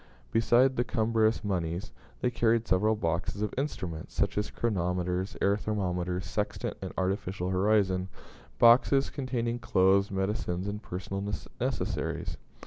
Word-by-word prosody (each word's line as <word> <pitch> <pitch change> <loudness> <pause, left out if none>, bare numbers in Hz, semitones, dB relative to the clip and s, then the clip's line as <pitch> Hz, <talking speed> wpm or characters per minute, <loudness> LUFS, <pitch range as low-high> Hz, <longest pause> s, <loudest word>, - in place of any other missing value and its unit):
Besides 120 +4 +4
the 120 - +1
cumbrous 110 -1 +1
moneys, 90 0 -2 0.3
they 125 - +1
carried 115 -1 +2
several 105 +4 +3
boxes 90 +2 -2
of 105 - -2
instruments, 90 - -4
such - - +1
as 105 - -1
chronometers, 90 -3 -1
air 100 +1 +3
thermometers, 90 -4 -2
sextant, 105 +4 -2
and - - -5
artificial 95 -1 -1
horizon, 95 -1 +2 0.5
boxes 125 - +5
containing 120 -3 -2
clothes, 95 -1 +3
medicines, 95 -1 -2
and 105 +1 -4
personal 95 +1 -5 0.4
necessaries. - - -2
100 Hz, 125 wpm, -29 LUFS, 90-115 Hz, 0.5 s, boxes